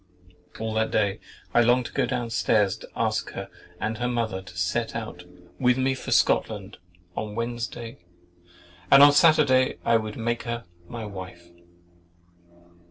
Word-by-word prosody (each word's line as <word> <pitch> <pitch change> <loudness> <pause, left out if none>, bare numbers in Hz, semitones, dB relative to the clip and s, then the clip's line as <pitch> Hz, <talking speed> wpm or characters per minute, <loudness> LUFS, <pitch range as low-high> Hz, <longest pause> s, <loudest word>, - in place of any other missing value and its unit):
— 90 0 -20
All 110 0 -3
that 110 0 +1
day 100 0 0 0.3
I 120 - +5
longed 120 +1 +3
to - - -8
go 135 -3 +1
down 120 -2 -3
stairs 105 -3 +2
to - - -13
ask - - -1
her - - -6 0.3
and 110 +1 -3
her 120 - 0
mother 115 -6 -2
to 95 -1 -13
set 95 +7 -1
out 110 -6 -6 0.3
with 125 -1 +3
me 130 0 +1
for 130 - -7
Scotland 105 -3 +1 0.4
on 105 -1 -4
Wednesday, 115 0 -5 0.9
and 140 - +9
on 145 0 +8
Saturday 145 -4 +4
I 115 - +4
would 110 -1 -5
make 120 0 -1
her 120 -2 -5 0.2
my 115 +3 -6
wife. 90 -3 -9
115 Hz, 160 wpm, -25 LUFS, 105-120 Hz, 0.9 s, and